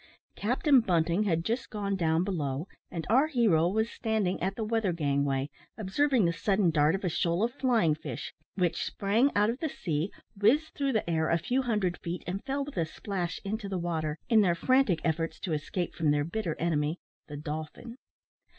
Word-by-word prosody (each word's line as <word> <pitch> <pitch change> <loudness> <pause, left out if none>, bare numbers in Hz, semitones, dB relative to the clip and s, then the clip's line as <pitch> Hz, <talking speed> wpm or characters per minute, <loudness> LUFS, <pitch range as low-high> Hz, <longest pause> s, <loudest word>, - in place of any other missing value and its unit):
Captain 260 +5 +3
Bunting 175 -1 +1
had 165 -3 0
just 235 +2 -2
gone 200 -2 -2
down 165 -2 +2
below, 155 -5 -2 0.2
and 165 -2 -5
our 260 +8 +4
hero 220 - +3
was 220 +3 +1
standing 220 -5 -1
at 190 +2 -1
the 225 - -3
weather 220 -3 0
gangway, 140 -3 0 0.3
observing 235 +3 +2
the 170 - +2
sudden 190 0 +2
dart 155 +2 +3
of 195 - -5
a - - +1
shoal 170 +4 0
of 240 +1 0
flying 235 - +2
fish, 150 -5 -6 0.2
which 175 -3 0
sprang 220 +8 +1
out 210 +2 +4
of 245 - -7
the 315 - -1
sea, 165 - -2 0.2
whizzed 240 +11 +3
through 275 -1 0
the 220 - 0
air 160 -2 +1
a 170 - +3
few 250 +10 0
hundred 210 -8 0
feet, 170 +1 -5
and 185 +3 -4
fell 275 +1 -1
with 285 -7 -10
a 165 - +2
splash 180 0 -4
into 205 0 -3
the 190 - -2
water, 160 -3 -2
in 225 -3 +5
their 175 -4 +3
frantic 255 -3 +2
efforts 165 0 -1
to 170 - -3
escape 165 +4 -2
from 160 -3 0
their 145 0 +2
bitter 170 0 -3
enemy, 155 -1 0 0.3
the 145 - -7
dolphin. 155 +9 -6
185 Hz, 195 wpm, -29 LUFS, 165-220 Hz, 0.3 s, in